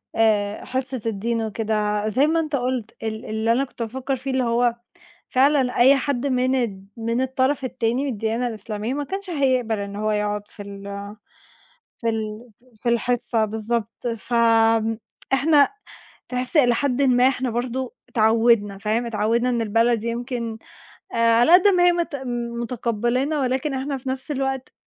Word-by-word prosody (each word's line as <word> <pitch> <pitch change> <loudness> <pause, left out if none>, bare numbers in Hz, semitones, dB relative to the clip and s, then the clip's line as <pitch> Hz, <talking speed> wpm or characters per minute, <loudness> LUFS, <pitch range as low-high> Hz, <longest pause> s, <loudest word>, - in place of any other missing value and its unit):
آآ، 210 -2 +1
حصة 260 -1 -3
الدين 225 +2 -1
وكده، 215 -1 -1
زي 270 +7 +3
ما 330 +1 +2
أنت 310 -3 -1
قلت 250 -3 -2
ال 220 0 -4
اللي 220 +1 0
أنا 250 +4 +2
كنت 255 - -12
بافكر 265 +4 -3
فيه 265 +1 -5
اللي 260 -1 +1
هو 235 0 +2 0.6
فعلًا 265 -1 +3
أي 265 +3 +7
حد 275 -1 -1
من 255 -1 +1
ال 215 -7 -1
من 230 +2 -1
الطرف 260 +2 0
التاني، 250 +1 -1
من 280 - -1
الديانة 225 +3 -1
الإسلامية 215 +2 -4
ما 290 0 -2
كانش 385 +3 -5
هيقبل 255 -7 +1
إنه 200 0 -5
هو 215 - +1
يقعد 210 0 -1
في 205 - -10
ال 200 0 -9 1.2
في 230 - -2
ال 220 +1 -3 0.3
في 245 - -1
الحصة 235 -1 +1
بالضبط، 225 +2 -3
فإحنا 230 +6 +2 0.6
تحس 250 +5 -1
إلى 245 -4 +5
حد 275 0 0
ما 255 -2 +4
إحنا 260 -1 0
برضو 255 - -3 0.2
اتعودنا 220 -2 +3
فاهم، 220 +4 -1
اتعودنا 230 +2 +1
إن 235 -2 0
البلد 230 +1 +2
يمكن 235 -1 -3 0.6
آآ، - - -3
على 230 +6 +5
قدّ 370 +3 +7
ما 360 -3 +4
هي 355 - +6
مت 340 -4 -2 0.5
متقبّلَانا، 240 +4 -1
ولكن 265 +2 -1
إحنا 270 +1 -2
في 260 0 -6
نفس 265 +3 -4
الوقت 270 -1 -2
240 Hz, 155 wpm, -23 LUFS, 225-265 Hz, 1.2 s, أي